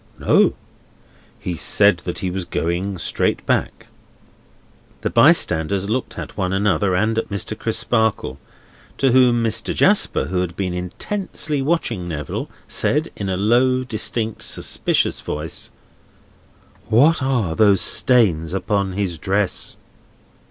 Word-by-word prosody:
"No. - - +3 0.9
He 90 - -4
said 85 +4 +3
that 90 - -4
he 90 - -1
was 95 0 -3
going 90 +3 -2
straight - - -1
back." - - -1 1.2
The - - -2
bystanders 95 +6 +3
looked 130 +2 -3
at - - -7
one 90 -2 -1
another, 95 -1 +1
and 110 +4 +1
at - - -5
Mr. 100 +1 -3
Crisparkle. 110 - -1 0.6
To 135 -2 +2
whom 120 -2 +4
Mr. 110 0 -1
Jasper, 205 +1 +3
who 90 0 -1
had 90 -1 -4
been 95 -2 -2
intensely 150 - -3
watching 135 - -1
Neville, 75 -4 -4 0.2
said, 155 +3 0
in 100 -2 -4
a 95 - -1
low, 125 +5 +2
distinct, 110 -2 -2
suspicious - - 0
voice: 75 +1 -5 1.2
"What 140 +8 +4
are 125 -10 0
those 100 -1 +4
stains 95 -9 +2
upon 100 -1 -1
his 95 -4 -2
dress?" 100 +1 -1
100 Hz, 125 wpm, -20 LUFS, 90-120 Hz, 1.2 s, whom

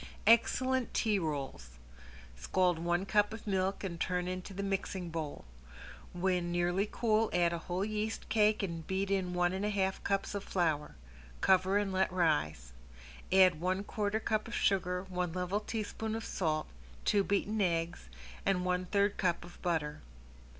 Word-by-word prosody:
~EXCELLENT 255 +3 +3
TEA 215 -3 +2
ROLLS~ 135 - -4 0.6
Scald 175 - +1
one 175 +2 0
cup 205 +1 +2
of 225 - -11
milk 195 -1 0
and 170 -4 -4
turn 180 0 -1
into 185 +2 -4
the 195 +1 -4
mixing 190 -3 -2
bowl. 155 - -5 0.7
When 180 -1 0
nearly 175 +4 +1
cool 225 -1 +2
add 175 -1 +3
a 170 - -2
whole 180 +3 -2
yeast 215 +1 -3
cake 215 -1 +3
and 165 -4 -4
beat 195 +1 -1
in 185 -2 0
one 175 0 +2
and 190 +1 -2
a 210 - +1
half 190 -2 0
cups 195 0 0
of 200 -1 -3
flour. 160 -5 0 0.4
Cover 190 +1 +4
and 205 -2 0
let 190 0 +2
rise. 75 - 0 0.6
Add 185 -4 +5
one 185 +2 0
quarter 210 +1 -1
cup 215 0 -1
of 235 - -5
sugar, 180 -2 +1
one 180 -3 -3
level 180 +3 -1
teaspoon 220 0 -4
of 225 - -4
salt, 155 -4 -1 0.4
two 200 -1 +3
beaten 205 +2 0
eggs, 165 - -1 0.3
and 180 -2 +1
one 180 0 0
third 200 +1 +2
cup 175 -2 0
of 175 - -14
butter. 160 -4 -1
185 Hz, 165 wpm, -32 LUFS, 175-205 Hz, 0.7 s, Add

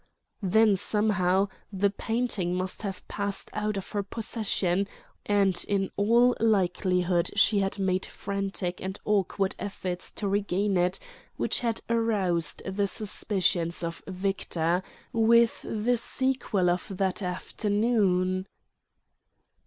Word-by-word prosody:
Then 210 +2 +4
somehow 195 -1 +2 0.2
the 200 0 +1
painting 215 -5 -1
must 185 0 -3
have 195 -3 -6
passed 200 -1 -3
out 210 -1 -2
of 195 - -6
her 205 - -1
possession; 200 -3 -1 0.4
and 200 -3 +3
in 195 -1 0
all 235 +5 +4
likelihood 180 -4 +2
she 205 0 +4
had 195 +1 -1
made 185 -1 0
frantic 195 -2 -3
and 190 +1 -4
awkward 195 -1 +1
efforts 185 -3 -4
to 205 - -3
regain 200 0 0
it 180 0 +2 0.4
which - - 0
had 230 -3 -1
aroused 205 -8 +1
the 200 +1 -1
suspicions 185 -5 +1
of 170 0 -4
Victor; 180 -2 -1 0.3
with 230 +1 +4
the 230 +3 0
sequel 235 -7 +1
of 180 +1 -2
that 190 0 0
afternoon.... 190 -1 0
195 Hz, 115 wpm, -27 LUFS, 185-210 Hz, 0.4 s, Then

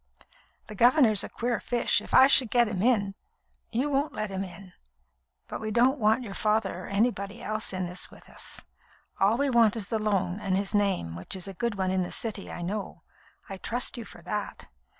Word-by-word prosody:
"The 215 - -9
governor's 235 -1 +4
a - - -6
queer 240 -1 -2
fish. 240 -1 +1
If - - -11
I 265 - +8
should 260 -4 +5
let 240 -1 +5
him 200 -4 -3
in 205 -4 +2 0.3
" - - -44
"You 275 - +1
won't 285 +1 0
let 215 -1 -3
him 190 0 -2
in. 185 0 -11 0.7
But - - -6
we 215 - -3
don't 250 +6 +3
want 220 +3 +3
your 205 -4 -7
father 210 -4 0
or - - -9
anybody 200 0 -1
else 215 0 -3
in 185 -1 -2
with 180 +1 -5
us. - - -10 0.6
All 205 +4 +3
we 280 0 +1
want 230 -3 +4
is 210 -3 -4
the 220 - 0
loan, 195 -3 0
and 195 -3 0
his 200 +1 -2
name, 195 - 0
which 85 - -3
is 185 0 -5
a 195 - -6
good 235 +3 -2
one 190 -1 -1
in 190 0 +1
the 180 - -3
City, 215 -4 -4
I 175 - -6
know. 200 +3 -5 0.4
I 195 - -6
trust 240 +6 -2
you 240 - -4
for - - -13
that. 210 - -5
210 Hz, 210 wpm, -27 LUFS, 195-235 Hz, 0.7 s, I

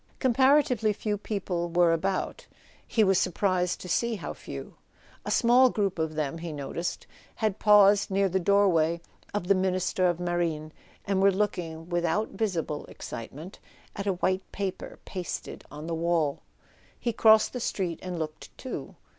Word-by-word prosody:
Comparatively 260 -4 +3
few 210 +1 -2
people 185 -4 -3
were 170 0 +4
about: 190 +3 -2 0.5
we 220 - +7
was 190 -2 +4
sur¬ 185 - 0
prised 180 -1 0
to - - -7
see 235 +6 0
how 195 - -5
few. - - -8 0.5
A - - -3
small 245 +2 +5
group 200 -6 -1
of 160 -1 -1
them, 155 +1 -2
he 170 0 -5
no¬ 140 -3 -6
ticed, 170 +1 -3 0.3
had 215 -3 -1
paused 205 -1 +6
near 195 0 +2
the 190 +1 0
doorway 170 -4 +3 0.3
of 205 -4 -3
the 200 - +6
Ministry 185 -1 +1
of 175 -1 0
Marine, 170 -3 -2 0.3
and 195 -1 +1
were 200 0 +6
looking—without 175 -1 -1
visible 180 -8 -2
excite¬ 115 - -7
ment—at 185 +5 -10
a 195 - +2
white 185 +1 -1
paper 195 -2 -5
pasted 180 -3 -6
on 150 +1 -8
the 165 - -3
wall. 165 -3 0 0.6
He 235 - -1
crossed 220 0 +5
the 250 - -3
street 185 -7 -2
and 180 -1 -5
looked 155 -1 -6
too. 260 - -6
185 Hz, 160 wpm, -27 LUFS, 170-205 Hz, 0.6 s, we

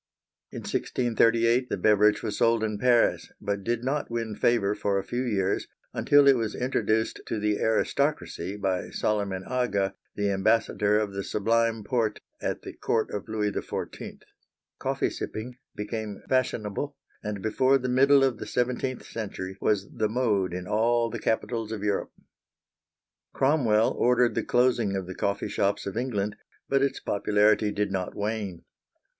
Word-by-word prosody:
In - - -7
1638 115 0 +2
the - - -1
beverage 105 +2 +4
was 105 -2 -3
sold 115 -2 +3
in 105 -2 -2
Paris, 120 0 +3
but 100 -1 -3
did 120 +2 -1
not 140 +3 -1
win 115 -2 -3
favor 110 -4 +2
for 100 -1 0
a 95 - -1
few 120 - -3
years 100 -6 0 0.3
until 145 -1 +5
it 135 - +7
was 110 -2 -2
introduced 110 -3 0
to - - -2
the 105 0 0
aristocracy 110 - 0
by 95 -3 -1
Soliman 100 -3 -1
Aga, 110 -7 0 0.2
the 100 -1 0
Ambassador 105 +1 +2
of 105 -2 -1
the 100 0 -3
Sublime 115 +2 +1
Porte 115 -3 0 0.2
at - - -3
the - - -7
Court 110 -1 -1
of 105 - -5
Louis 105 -1 0
XIV. - - -6 0.6
Coffee - - 0
sipping 120 +3 -6 0.2
became 105 0 -5
fashionable, 130 +1 -1 0.2
and 105 -3 -5
before 130 +5 +3
the 130 -1 -3
middle 135 +2 +5
of 130 -4 +1
the - - -6
seventeenth 125 +1 -1
century 95 -4 -5
was 100 -2 +1
the 110 -1 -2
mode 105 -6 +1
in 90 0 -5
all 115 +2 +2
the - - -4
capitals 115 -1 -1
of 105 -2 -4
Europe. 105 -1 -1 1.2
Cromwell 125 -6 +3
ordered 125 -1 +3
the - - 0
closing 120 -5 +2
of 95 -1 -2
the 95 - -6
coffee 100 +2 -1
shops 100 0 0
of 100 - -4
England, 105 -4 -2 0.3
but 135 0 +2
its 140 -1 0
popularity 105 +1 +2
did 105 -1 -1
not 95 -2 -3
wane. 105 -4 -3
110 Hz, 155 wpm, -27 LUFS, 100-120 Hz, 1.2 s, it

